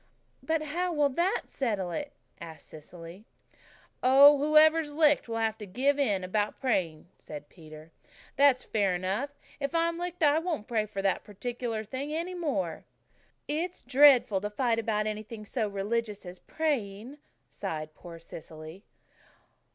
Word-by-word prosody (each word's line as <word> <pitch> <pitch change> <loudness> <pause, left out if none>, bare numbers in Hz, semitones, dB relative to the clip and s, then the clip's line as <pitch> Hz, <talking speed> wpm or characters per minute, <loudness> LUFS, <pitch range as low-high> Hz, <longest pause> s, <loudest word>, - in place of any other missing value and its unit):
"But 320 -1 -1
how 350 +4 -2
will 295 -3 +2
that 345 - 0
settle 205 -9 -2
it?" 290 - -4 0.3
asked 160 -3 -10
Cecily. 170 +5 -12 0.7
"Oh, 275 +3 +8
whoever's 305 +1 +4
licked 295 -5 +3
will 225 - -2
have 225 -1 -1
to 210 - -8
give 275 +8 +1
in 205 -9 +1
about 205 +3 -1
the - - -36
praying," 175 - -1
said 145 -1 -10
Peter. 155 -1 -13 0.4
"That's 275 -2 +4
fair 200 -4 0
enough. 190 +10 -2 0.3
If 280 +3 -3
I'm 335 0 +1
licked 355 -1 -4
I 295 +1 +5
won't 325 - -3
pray 220 -4 0
for 195 -1 -5
that 195 - +1
particular 230 +1 -4
thing 265 +7 -5
any 335 +4 -3
more." 235 - -2 0.6
"It's 335 +5 -3
dreadful 255 -6 +5
to 210 - -3
fight 230 +2 0
about 215 -1 -1
anything 215 0 -6
so 220 0 -2
religious 205 +1 -3
as 180 0 -9
praying," 260 -4 -3 0.3
sighed 155 -1 -5
poor 170 +1 -11
Cecily. 160 +2 -11
230 Hz, 150 wpm, -29 LUFS, 195-290 Hz, 0.7 s, Oh